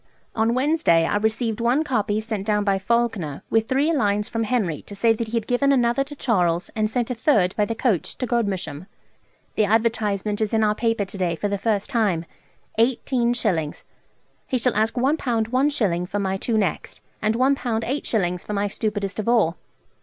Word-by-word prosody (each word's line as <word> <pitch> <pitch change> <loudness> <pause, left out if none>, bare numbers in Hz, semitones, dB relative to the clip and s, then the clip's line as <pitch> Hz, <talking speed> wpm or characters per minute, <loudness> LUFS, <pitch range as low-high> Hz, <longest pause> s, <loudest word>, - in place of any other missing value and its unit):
On 225 +1 +1
Wednesday 260 - +3
I - - +1
received 220 +1 -1
one 245 +6 +2
copy 215 -7 0
sent 220 -2 -4
down 210 -1 +2
by 195 -1 +1
Falkener, 205 -8 -1
with 225 0 +2
three 285 +5 +2
lines 210 -6 +1
from 230 -1 -2
Henry 205 - -1
to 205 - -8
say 225 +3 +3
that 225 0 -4
he 230 +2 -2
had 225 - -2
given 265 +4 +2
another 245 0 +2
to 290 +1 -10
Charles 180 -10 +1
and 215 -1 +1
sent 240 +1 -1
a - - +1
third 215 -7 +2
by 210 - +2
the 230 - -3
coach 225 - -1
to 255 - -2
Godmersham.... 195 - -2 0.7
The 215 - +2
advertisement 215 -2 0
is 220 +1 0
in 220 - +3
our 210 0 +3
paper 225 -1 0
to 195 +1 -10
day 175 -2 0
for 205 - -2
the 200 -1 -2
first 210 +2 -1
time: 200 -9 +1 0.5
18_s_. 235 - +1 0.6
He 255 - 0
shall 250 0 +1
ask 220 +3 +1
1_l_. 270 +5 +2
1_s_. 230 -6 0
for 205 - -2
my 190 -1 -1
two 220 +3 -1
next, 195 -6 -2 0.2
and 215 +1 +1
1_l_. 260 +3 +3
8_s_. 225 -7 -1
for 210 - -5
my 205 0 0
stupidest 205 -1 -3
of 215 - -1
all. 210 -9 +3
220 Hz, 190 wpm, -23 LUFS, 200-240 Hz, 0.7 s, Wednesday